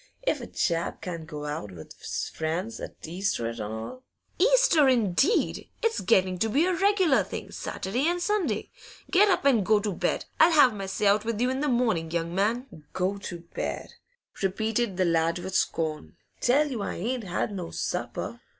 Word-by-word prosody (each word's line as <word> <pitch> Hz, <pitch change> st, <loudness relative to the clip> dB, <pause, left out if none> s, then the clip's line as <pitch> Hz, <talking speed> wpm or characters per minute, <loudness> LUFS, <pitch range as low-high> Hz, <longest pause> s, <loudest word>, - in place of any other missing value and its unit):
If -, -, +1 dB
a -, -, -7 dB
chap 170 Hz, -1 st, -1 dB
can't 170 Hz, -3 st, -5 dB
go 150 Hz, -1 st, -6 dB
out 145 Hz, -9 st, -4 dB
with 80 Hz, -3 st, -11 dB
's -, -, -4 dB
friends 170 Hz, +8 st, -3 dB
't -, -, -8 dB
Easter 175 Hz, -, -1 dB
an' 115 Hz, -1 st, -5 dB
all 110 Hz, -, -6 dB, 0.2 s
?' -, -, -39 dB
'Easter, 385 Hz, -, +5 dB
indeed! 245 Hz, -, +2 dB
It's 455 Hz, -1 st, +1 dB
getting 185 Hz, 0 st, +2 dB
to 220 Hz, -, +1 dB
be 285 Hz, +9 st, +3 dB
a 370 Hz, -, +1 dB
regular 380 Hz, -5 st, +3 dB
thing, -, -, -7 dB
Saturday 245 Hz, +10 st, -2 dB
and 350 Hz, +1 st, +1 dB
Sunday. 415 Hz, +2 st, -1 dB, 0.4 s
Get 400 Hz, +3 st, +5 dB
up 360 Hz, -, +1 dB
and 245 Hz, -7 st, +4 dB
go 215 Hz, +2 st, +4 dB
to 205 Hz, -1 st, -2 dB
bed! -, -, -1 dB
I'll 330 Hz, +2 st, +6 dB
have 265 Hz, -6 st, +6 dB
my 195 Hz, -2 st, -5 dB
say 190 Hz, +2 st, -2 dB
out 205 Hz, +1 st, +4 dB
with 225 Hz, -1 st, -2 dB
you 250 Hz, +2 st, +2 dB
in 260 Hz, -, -2 dB
the 295 Hz, -, 0 dB
morning, 225 Hz, -10 st, +1 dB
young 170 Hz, 0 st, -2 dB
man.' 205 Hz, -, -1 dB
'Go 190 Hz, +2 st, -1 dB
to 175 Hz, -3 st, -7 dB
bed!' -, -, -4 dB, 0.5 s
repeated 220 Hz, +1 st, 0 dB
the 185 Hz, -, +2 dB
lad 165 Hz, 0 st, +2 dB
with 180 Hz, +1 st, -6 dB
scorn. 155 Hz, -, -1 dB, 0.2 s
'Tell 285 Hz, +4 st, +3 dB
you 235 Hz, -5 st, -3 dB
I -, -, -3 dB
ain't 235 Hz, +4 st, -3 dB
had 180 Hz, +3 st, -2 dB
no 180 Hz, -4 st, -5 dB
supper. -, -, -4 dB
205 Hz, 190 wpm, -27 LUFS, 170-265 Hz, 0.5 s, I'll